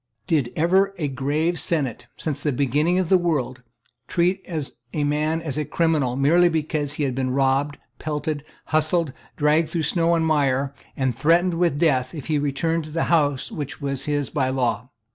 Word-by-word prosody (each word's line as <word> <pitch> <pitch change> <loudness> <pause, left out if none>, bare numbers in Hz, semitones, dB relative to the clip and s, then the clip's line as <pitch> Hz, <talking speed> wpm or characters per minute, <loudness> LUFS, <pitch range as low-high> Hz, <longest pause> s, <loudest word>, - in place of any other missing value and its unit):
Did 140 -7 +1
ever 190 +4 +2
any 150 -4 -1
grave 150 +6 0
senate, 140 -8 -1
since 145 -3 -4
the 150 - 0
beginning 145 +7 +1
of 185 -3 0
the 190 - +5
world, 135 -7 -1 0.5
treat 180 +2 +1 0.5
a 150 - 0
man 155 +3 0
as 150 -2 -2
a - - 0
criminal 150 -6 +1
merely 165 +6 +4
because 155 -3 -1
he 150 - -2
had 135 -3 0
been 130 0 -1
robbed, 135 +2 +1 0.2
pelted, 150 -1 -3 0.2
hustled, 155 -1 +1 0.2
dragged 155 +2 +3
through 165 -2 -1
snow 165 +2 +2
and 165 -1 +1
mire, 140 -3 +1 0.2
and 130 -3 0
threatened 170 +7 +3
with 170 -4 +1
death 135 -4 +1
if 145 - -7
he 155 -2 +1
returned 155 +3 -1
to - - -9
the 165 +2 -1
house 145 -5 +1
which 145 -2 -5
was 140 -2 -3
his 145 -2 -1
by 135 -4 0
law? 125 -3 -1
150 Hz, 180 wpm, -23 LUFS, 135-165 Hz, 0.5 s, the